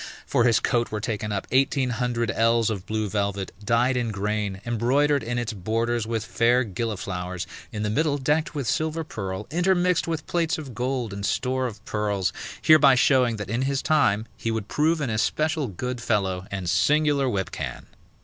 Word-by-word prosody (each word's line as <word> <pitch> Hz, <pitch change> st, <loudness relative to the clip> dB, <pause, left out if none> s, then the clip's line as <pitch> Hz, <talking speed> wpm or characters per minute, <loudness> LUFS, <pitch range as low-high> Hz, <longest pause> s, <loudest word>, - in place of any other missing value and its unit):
For 120 Hz, -, +2 dB
his 115 Hz, -3 st, +4 dB
coat 120 Hz, -2 st, 0 dB
were 105 Hz, -, -2 dB
taken 105 Hz, -1 st, -3 dB
up 100 Hz, -1 st, -2 dB
eighteen 135 Hz, -1 st, +2 dB
hundred 120 Hz, -2 st, -1 dB
ells 115 Hz, 0 st, +2 dB
of 100 Hz, -3 st, -5 dB
blue 110 Hz, -1 st, -1 dB
velvet, 100 Hz, -1 st, -2 dB
dyed 120 Hz, +4 st, +2 dB
in 120 Hz, -2 st, 0 dB
grain, 105 Hz, -1 st, -2 dB
embroidered 130 Hz, +5 st, +2 dB
in 120 Hz, +2 st, -3 dB
its 120 Hz, -1 st, -2 dB
borders 115 Hz, +3 st, -1 dB
with 115 Hz, -2 st, -2 dB
fair 120 Hz, +3 st, +3 dB
gilliflowers, 95 Hz, -5 st, -4 dB, 0.3 s
in 105 Hz, -1 st, -4 dB
the 105 Hz, -, 0 dB
middle 145 Hz, +4 st, +1 dB
decked 150 Hz, +4 st, 0 dB
with 140 Hz, -3 st, -2 dB
silver 160 Hz, +5 st, 0 dB
purl, 100 Hz, -8 st, -5 dB
intermixed 180 Hz, +1 st, +2 dB
with 160 Hz, -2 st, -3 dB
plates 170 Hz, -2 st, 0 dB
of 145 Hz, -5 st, -7 dB
gold 125 Hz, -3 st, -2 dB
and 100 Hz, 0 st, -6 dB
store 130 Hz, +4 st, 0 dB
of 110 Hz, -3 st, -10 dB
pearls, 105 Hz, -3 st, -1 dB, 0.3 s
hereby 150 Hz, -4 st, +7 dB
showing 125 Hz, -2 st, +3 dB
that 105 Hz, -1 st, -6 dB
in 120 Hz, +2 st, 0 dB
his 135 Hz, 0 st, 0 dB
time 110 Hz, -9 st, +2 dB
he 115 Hz, -, -3 dB
would 110 Hz, -2 st, -2 dB
prove 155 Hz, +4 st, +1 dB
an 130 Hz, -5 st, -1 dB
especial 155 Hz, +7 st, 0 dB
good 120 Hz, +5 st, -4 dB
fellow 95 Hz, -4 st, -1 dB
and 95 Hz, -3 st, -4 dB
singular 145 Hz, -, +3 dB
whipcan. 65 Hz, -, -4 dB
115 Hz, 180 wpm, -25 LUFS, 105-135 Hz, 0.3 s, hereby